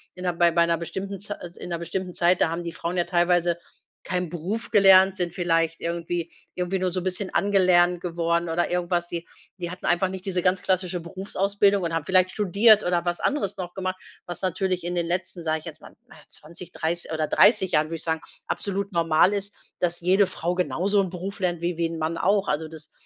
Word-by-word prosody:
in 180 - -9
'ner 180 - 0
bei 170 0 +4 0.2
'ner 170 0 +1
bestimmten 190 +4 -5
Zei 205 +2 -4 0.2
in - - -7
'ner 170 - -2
bestimmten 180 +2 -4
Zeit, 175 +1 +3
da - - +4
haben 170 +1 -3
die 170 - -4
Frauen 170 +2 -4
ja 175 - +3
teilweise 175 -1 +2 0.5
keinen 180 -1 -2
Beruf 185 +7 -4
gelernt, 190 -1 +6
sind 175 -2 -2
vielleicht 165 -2 +1
irgendwie 170 0 -3 0.2
irgendwie 180 +1 -1
nur 185 0 0
so 180 +1 -3
'n - - -8
bisschen 185 +1 -2
angelernt 180 -3 +3
geworden 170 -1 -1
oder 175 +2 0
irgendwas. 175 -1 0
Die 170 0 -5 0.3
die 175 - -4
hatten 180 - -8
einfach 175 +2 +2
nicht 190 +1 -7
diese 185 -2 -1
ganz 180 +1 +1
klassische 185 -1 0
Berufsausbildung 195 +2 0
und 165 -1 -2
haben 165 -2 -1
vielleicht 185 -1 +3
studiert 210 +2 +4
oder 175 -1 0
was 175 0 -1
anderes 275 -10 -1
noch 180 -1 -6
gemacht, 185 -1 -3 0.3
was 175 - -5
natürlich 185 -1 -1
in 175 +1 -3
den 170 -1 0
letzten, 175 0 -3
sage 160 -1 0
ich - - -16
jetzt 155 -2 -9
mal, - - -14
na, 250 - -16
20, 170 +2 -10
dreiß 170 +2 -2
oder 155 -1 0
30 200 -1 +4
Jahren, 150 +1 +3
würde 165 - -4
ich - - -8
sagen, 160 -1 -1 0.3
absolut 200 0 -2
normal 170 +2 +3
ist, 200 0 -2 0.2
dass 175 -1 0
jede 190 +3 +4
Frau 180 -1 -3
genauso 190 +2 +1
'n 190 -2 0
Beruf 190 +3 -6
lernt 175 -3 -1
wie 175 -1 -2
wie 170 - +1
'n 165 -1 -6
Mann 160 +1 -2
auch. 200 +2 +2
Also 155 +2 -1
das 155 0 -10
180 Hz, 220 wpm, -25 LUFS, 170-190 Hz, 0.5 s, gelernt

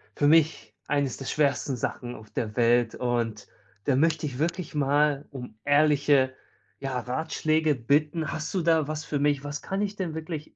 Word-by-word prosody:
für 145 - +2
mich 160 0 +3
eines 140 -3 0
der 135 - -8
schwersten 140 -1 +1
Sachen 120 +1 -4
auf 110 0 -13
der 105 -2 -3
Welt. 120 -1 +3
Und 120 -3 -2 0.4
da 140 - +3
möchte 160 +2 +2
ich 135 -2 -5
wirklich 170 +3 -2
mal 145 0 +2
um 125 -5 -8
ehrliche, 145 -2 +4 0.5
ja, 135 -2 -2
Ratschläge 155 +4 0
bitten. 150 +6 +1
Hast 155 +3 -4
du 185 - +2
da 160 -3 +3
was 155 0 -4
für 145 - -2
mich? 145 -1 +1
Was 145 +1 -5
kann 195 +1 -3
ich 205 0 -2
denn 180 -6 -4
wirklich 160 -1 -6
145 Hz, 175 wpm, -27 LUFS, 130-155 Hz, 0.5 s, ehrliche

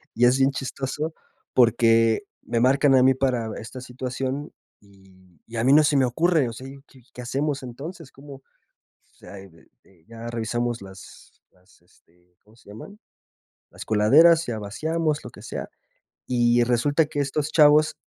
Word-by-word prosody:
Y 120 - +3
es 125 +2 +3
bien 135 +1 +4
chistoso, 135 +4 -5 0.4
porque 115 - +3 0.2
me 115 - -2
marcan 135 +3 +3
a 125 - +5
mí 130 +1 +5
para 125 -4 -1
esta 120 +3 -9
situación 130 +3 -5 0.3
y 95 -4 -23
y 115 - -11
a 115 - 0
mí 130 - +3
no 155 +1 +6
se 150 -1 +1
me 130 - +3
ocurre, 155 +1 +1
o - - -8
sea, 130 +3 -10 0.2
¿qué 130 - -20
qué 125 - -9
hacemos 140 +3 -3
entonces? 140 +5 -9
¿Cómo? 140 0 -13 0.4
O - - -40
sea, 100 - -12 0.7
ya 115 0 -10
revisamos 120 0 -3
las 95 -1 -14
las 90 -1 -28
este, 90 0 -31
¿cómo 105 +2 -23
se 100 - -20
llaman? 200 - -12 0.7
Las - - -10
coladeras, 155 +11 +5
ya 115 -3 -4
vaciamos, 155 +9 -2
lo - - -10
que - - -15
sea. - - -7 0.6
Y 120 -1 +2
resulta 145 +6 +1
que 145 -1 -5
estos 145 +2 -2
chavos 155 0 +4
125 Hz, 160 wpm, -23 LUFS, 115-145 Hz, 0.7 s, no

